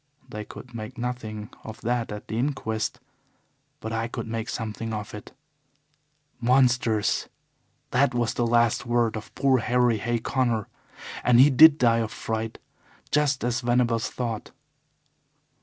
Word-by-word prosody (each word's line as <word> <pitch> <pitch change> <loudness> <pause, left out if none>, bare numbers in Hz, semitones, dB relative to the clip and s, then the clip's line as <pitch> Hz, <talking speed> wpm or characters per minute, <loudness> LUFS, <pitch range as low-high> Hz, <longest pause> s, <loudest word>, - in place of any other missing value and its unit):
They 105 -4 -6
could 125 +3 -11
make 110 -1 -7
nothing 115 -4 -5
of 110 - -9
that 120 -1 -1
at 105 0 -7
the - - -6
inquest. 120 -5 -2 0.8
But 110 0 -5
I 115 0 -1
could - - -5
make 110 0 -4
something 110 +1 -4
of 105 -1 -6
it. 105 - -9 1.1
Monsters! 125 -3 +2 0.6
That 130 0 +2
was 120 -2 0
the 120 - 0
last 115 -1 +3
word 120 -2 +1
of 110 - -8
poor 135 -2 +3
Harry 120 -1 +2
Hay 120 +3 0
Connor. 120 -2 0 0.6
And 120 -1 +5
he 140 +3 +8
DID 155 +3 +8
die 115 -4 +3
of 110 -1 -2
fright, 110 0 -4 0.5
just 145 -4 +2
as 120 0 0
Venables 120 -2 +1
thought. 115 -4 -4
120 Hz, 140 wpm, -25 LUFS, 110-125 Hz, 1.1 s, he